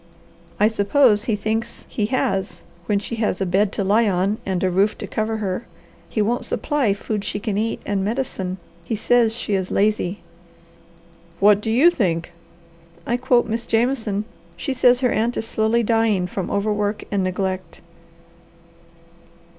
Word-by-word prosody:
"I 210 - +5
suppose 220 +1 +3
he 225 - +1
thinks 220 +3 -3
he 210 -2 -2
has 195 -5 -1 0.3
when 205 - +2
she 225 +3 -4
has 215 -4 0
a 195 - 0
bed 195 +3 +2
to 200 - -1
lie 210 +3 +3
on 195 +3 0
and 190 -1 -1
a 185 - +2
roof 200 +4 +2
to - - -5
cover 220 0 -2
her. 200 +1 -3 0.4
He 215 - 0
won't 240 +4 0
supply 270 -9 0
food 210 0 -3
she 205 - -3
can 210 -1 -2
eat 220 +2 -2
and 200 -1 -1
medicine. 200 -5 -2 0.3
He 220 - -2
says 225 +1 +3
she 225 -3 -3
is 190 -1 0
lazy." 205 -2 0 1.2
"What 205 +1 +5
do 220 - -3
you 270 +10 +5
think?" 175 - -1 0.7
"I 240 - 0
quote 245 -1 +2
Miss 230 +1 -3
Jameson. 225 -3 0 0.3
She 175 +10 -2
says 250 0 +4
her 250 - +2
aunt 230 +2 0
is 220 - -2
slowly 225 +1 +1
dying 225 -4 +2
from 180 +1 -4
overwork 205 0 -1
and 200 -2 +1
neglect." 185 0 -3
210 Hz, 160 wpm, -22 LUFS, 195-230 Hz, 1.2 s, I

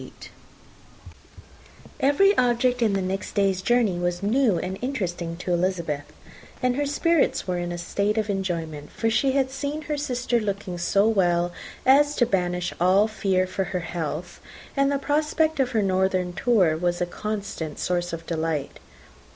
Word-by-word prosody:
Every 390 +10 +4
object 245 0 +2
in 220 -3 +3
the 195 -1 0
next 190 +1 -3
day's 195 -2 +2
journey 225 -5 +2
was 175 +1 -2
new 225 -2 +3
and 185 +2 -4
interesting 175 -10 -3
to 180 0 -2
Elizabeth; 170 -5 -1 0.5
and 250 -1 +1
her 290 +1 0
spirits 330 - +1
were 180 -1 -1
in 175 0 -3
a 175 - -4
state 200 +5 -1
of 215 -1 0
enjoyment; 165 -7 -3
for 225 -1 -1
she 265 +4 +2
had 265 -1 +1
seen 285 +3 -4
her 295 0 -3
sister 250 -4 0
looking 200 -4 -4
so 200 +4 +3
well 175 -5 +2 0.3
as 290 +3 +5
to 240 - +3
banish 180 -4 -1
all 190 +4 +5
fear 195 -4 0
for 185 +1 -2
her 180 0 -3
health, 165 0 -5 0.3
and 275 0 +2
the 280 - +1
prospect 305 +2 0
of 260 -2 +2
her 225 -4 +1
northern 185 -1 +1
tour 190 -8 +3
was 175 +1 -1
a 175 - +1
constant 200 -5 -5
source 175 -1 -1
of 165 0 -6
delight. 160 -3 -2
195 Hz, 160 wpm, -25 LUFS, 175-250 Hz, 0.5 s, as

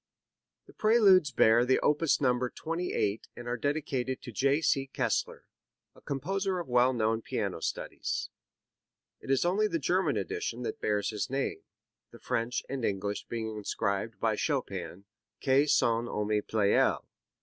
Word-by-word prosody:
The - - -17
Preludes 200 -7 +5
bear 120 -2 +4
the 130 +1 +3
opus 150 +1 +2
number 125 -2 +1
28 165 - -2
and 120 - -9
are 120 - -1
dedicated 135 -2 -2
to 125 - -7
J. 135 +5 +2
C. 135 -4 +1
Kessler, - - -2 0.5
a - - -19
composer 190 +7 -2
of 175 - -4
well 125 +1 +4
known 115 -2 0
piano - - -3
studies. - - -3 0.9
It - - -12
is 135 +4 +2
only 200 +5 +2
the 170 - -1
German 165 - +1
edition 115 +4 -3
that - - -5
bears 105 0 0
his 105 -2 -3
name, 135 +1 -2 0.5
the 120 - -14
French 120 0 -2
and 135 -2 -4
English 100 0 -2
being 110 -2 -4
inscribed 105 +1 -2
by 115 -1 +1
Chopin 100 - -3 0.4
"a 140 +2 +4
son 115 -4 +2
ami 105 -1 0
Pleyel." 105 -1 +2
125 Hz, 150 wpm, -30 LUFS, 110-145 Hz, 0.9 s, Preludes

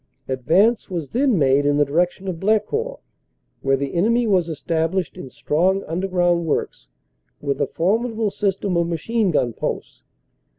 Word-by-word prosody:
Ad 130 -1 -3
vance 200 - +3
was 170 -6 -4
then 255 -3 +2
made 140 -1 +3
in 145 0 +2
the 145 - +4
direction 175 +6 0
of 175 -3 -3
Blecourt, 220 - 0 0.6
where 135 0 +2
the 140 0 -4
enemy 230 +7 +2
was 185 -6 +2
established 165 +3 -1
in 180 -8 -8
strong 185 +9 0
underground 175 -1 0
works - - -2 0.5
with 140 -1 -2
a - - +2
formidable 220 +4 0
system 195 -2 -1
of 170 0 +1
machine 200 +6 0
gun 125 -7 +1
posts. - - -5
180 Hz, 155 wpm, -21 LUFS, 155-210 Hz, 0.6 s, the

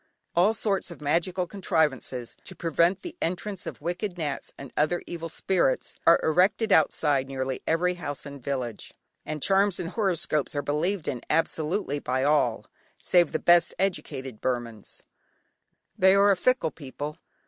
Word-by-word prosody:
All 190 +6 +4
sorts 200 -4 0
of 170 - -10
magical 170 +5 0
contrivances 155 - -1
to - - -10
prevent 170 +3 +1
the 350 - -7
entrance 185 +2 -3
of - - -6
wicked 175 +3 -3
"nats" 150 -4 -4
and 140 -2 -10
other 155 +4 +1
evil 165 -1 -6
spirits, 175 -4 0
are 170 - +7
erected 195 +7 +2
outside 145 -4 +3
nearly 130 -1 -3
every 180 +3 +2
house 145 -6 -5
and 140 -2 -9
village, 125 -6 -4 0.3
and 155 -2 -3
charms 195 -1 +3
and 170 - -3
horoscopes 175 - 0
are 145 - -1
believed 160 +6 -1
in 125 -4 -2
absolutely 160 0 0
by 130 -1 -1
all 140 -6 +2 0.3
save 175 -3 +3
the - - 0
best 175 +1 +4
educated 135 - -3
Burmans. 120 -4 -4 0.9
They 190 +1 +5
are 200 +1 +5
a - - +4
fickle 220 -4 +1
people. 145 +2 -7
165 Hz, 150 wpm, -26 LUFS, 140-185 Hz, 0.9 s, are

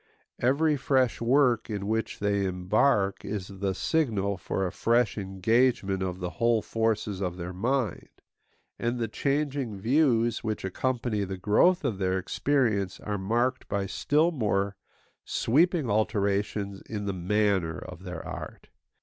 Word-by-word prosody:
Every 145 +5 +2
fresh 130 -3 +1
work 120 -2 +3
in 100 -2 -3
which 110 +2 -1
they 100 -1 0
embark 95 +3 +1
is 100 -2 -4
the 95 -1 -1
signal 100 -2 0
for 95 +1 -2
a 90 - -2
fresh 115 -1 +2
engagement 100 +1 +1
of 90 -1 -2
the 90 -1 -3
whole 115 -2 +3
forces 110 -3 -1
of 90 -2 -2
their 90 +1 -5
mind; 120 +2 -1 0.7
and 120 +1 -1
the 115 -1 -1
changing 140 -1 -1
views 120 -1 +2
which 110 -3 -3
accompany 115 +1 -1
the 95 0 -4
growth 125 - +3
of 110 -8 -1
their 95 -1 +1
experience 105 -2 0
are 105 -1 -3
marked 120 +6 0
by 100 -1 -1
still 150 - +2
more 100 - 0 0.5
sweeping 160 +3 +2
alterations 100 -1 0
in 105 -2 -5
the 100 - -1
manner 95 -2 +1
of 90 -1 -9
their 90 -1 -7
art. - - -8
105 Hz, 140 wpm, -27 LUFS, 95-125 Hz, 0.7 s, work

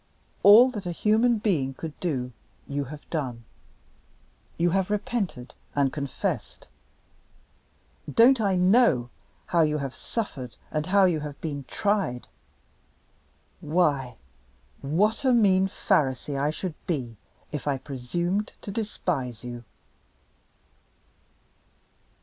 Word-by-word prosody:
All 230 +6 +8
that 205 -6 -6
a - - -1
human 220 +6 +3
being 155 -11 0
could 160 +1 -6
do 130 -8 -2 0.4
you 140 0 -2
have 150 +3 -10
done 125 -8 -3 1.1
you 175 +1 +2
have 190 +1 +1
repented 200 - -2 0.2
and 140 -2 +2
confessed. 140 -3 -4 1.4
Don't 240 - +6
I 195 -3 +2
know 180 - +4 0.3
how 170 - +2
you 150 -1 +2
have 135 -3 -4
suffered 135 - -5
and 155 0 -2
how 195 +1 +5
you 170 -4 +2
have 150 -1 -7
been 145 -4 -5
tried! 200 - -1 1.3
Why, 145 -6 0 0.6
what 200 - +1
a 260 -2 +4
mean 195 -5 +4
Pharisee 140 -6 0
I 140 +2 +1
should 170 +2 -4
be 130 -9 -2 0.4
if 150 -2 -5
I 140 -2 +1
presumed 170 +10 -3
to 200 - -5
despise 165 - -3
you!" 120 -1 -7
160 Hz, 115 wpm, -26 LUFS, 135-200 Hz, 1.4 s, All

